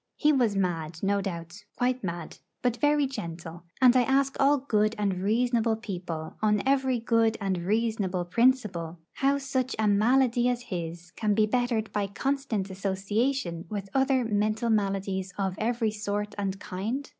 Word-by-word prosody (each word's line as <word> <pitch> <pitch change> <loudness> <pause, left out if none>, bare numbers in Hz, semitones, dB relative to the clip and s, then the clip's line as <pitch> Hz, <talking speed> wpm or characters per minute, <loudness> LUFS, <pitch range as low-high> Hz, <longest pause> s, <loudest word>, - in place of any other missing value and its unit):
He 300 -1 +3
was 240 -7 +2
mad, 165 -3 -2
no 200 +1 +2
doubt, 175 +1 -6
quite 250 0 0
mad, 170 -3 -5 0.2
but 245 -1 +1
very 295 +2 +3
gentle; 170 -8 -7
and 255 -1 +6
I 255 - +6
ask 270 +2 +2
all 280 +1 +5
good 215 -5 +1
and 200 -3 0
reasonable 230 +2 +2
people, 180 -7 -6
on 210 -1 +2
every 265 -2 +2
good 230 -1 +2
and 195 -3 -1
reasonable 200 -2 0
principle, 195 -6 +1 0.2
how 275 +1 +2
such 260 -2 -2
a 215 -1 +1
malady 240 +4 +3
as 245 0 -2
his 170 -4 -6
can 210 +2 0
be 215 0 +4
bettered 235 -1 0
by 205 -1 0
constant 225 -3 -2
association 195 0 -1
with 200 -2 -5
other 265 -2 +2
mental 215 +2 0
maladies 195 -2 -1
of 190 -2 -1
every 230 0 0
sort 210 0 -3
and 195 -1 -3
kind? 220 +10 -4
215 Hz, 155 wpm, -27 LUFS, 190-250 Hz, 0.2 s, and